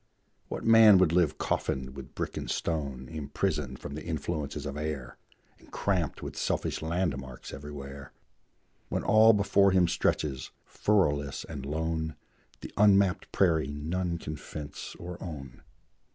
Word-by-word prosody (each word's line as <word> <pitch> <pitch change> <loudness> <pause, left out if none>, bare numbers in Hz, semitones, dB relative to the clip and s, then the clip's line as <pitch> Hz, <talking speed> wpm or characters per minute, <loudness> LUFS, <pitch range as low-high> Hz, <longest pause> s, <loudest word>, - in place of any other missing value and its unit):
What - - -5
man 110 -3 +8
would 90 -3 +4
live 85 -3 +2
coffined 65 0 -2
with 70 -2 -10
brick - - -3
and - - -4
stone, 70 -6 -2
Imprisoned 75 -3 -2
from 70 - -7
the 75 - -6
influences 80 -3 -3
of 70 -1 -4
air, 75 -4 -4 0.4
And - - -20
cramped 90 -7 -1
with - - -6
selfish - - -1
land 85 -1 0
marks 65 -2 -9
everywhere, 70 -1 -8 0.8
When - - -1
all 110 +1 +7
before 100 -1 +4
him 95 -2 +4
stretches, 70 -5 0 0.2
furrowless 75 -9 +1
and 70 -4 -6
lone, 80 +1 -2 0.5
The - - -8
unmapped 100 -2 +4
prairie 80 -6 +3
none 85 +4 -2
can 75 -2 -6
fence 75 +2 -8
or 90 0 -8
own? 70 -8 -8
80 Hz, 140 wpm, -29 LUFS, 70-90 Hz, 0.8 s, man